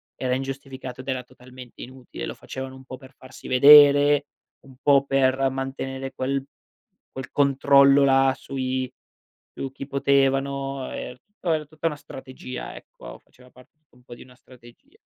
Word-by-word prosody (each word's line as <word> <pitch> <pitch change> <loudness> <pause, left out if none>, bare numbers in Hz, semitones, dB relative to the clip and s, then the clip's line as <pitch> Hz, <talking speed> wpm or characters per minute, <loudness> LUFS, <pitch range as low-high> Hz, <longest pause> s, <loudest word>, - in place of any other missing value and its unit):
era 125 -1 -1
ingiustificato 135 -1 -7
ed 130 - -17
era 130 -1 -2
totalmente 125 0 -14
inutile. 130 0 -9
Lo - - -5
facevano 130 0 -8
un 130 - -14
po' 130 -1 -9
per 130 +1 -16
farsi 130 0 -13
vedere, 145 +2 +7 0.4
un 135 -1 -16
po' 140 -1 +4
per 135 -1 +2
mantenere 135 0 -5
quel 135 +1 -2 0.7
quel 130 0 -8
controllo 140 0 +4
là 135 -1 +4
sui 130 -1 -4 0.6
su 135 -1 -6
chi 135 0 -8
potevano 135 0 0
e 125 - -7 0.2
po 175 - -2
era 155 -1 -1
tutta 155 +2 -6
una 150 - -7
strategia, 130 -2 -9
ecco, - - -13
faceva 125 0 -22
parte 125 0 -20 0.2
un 125 - -24
po' 120 - -11
di - - -14
una 125 0 -17
strategia. 120 -2 -20
135 Hz, 155 wpm, -24 LUFS, 130-140 Hz, 0.7 s, vedere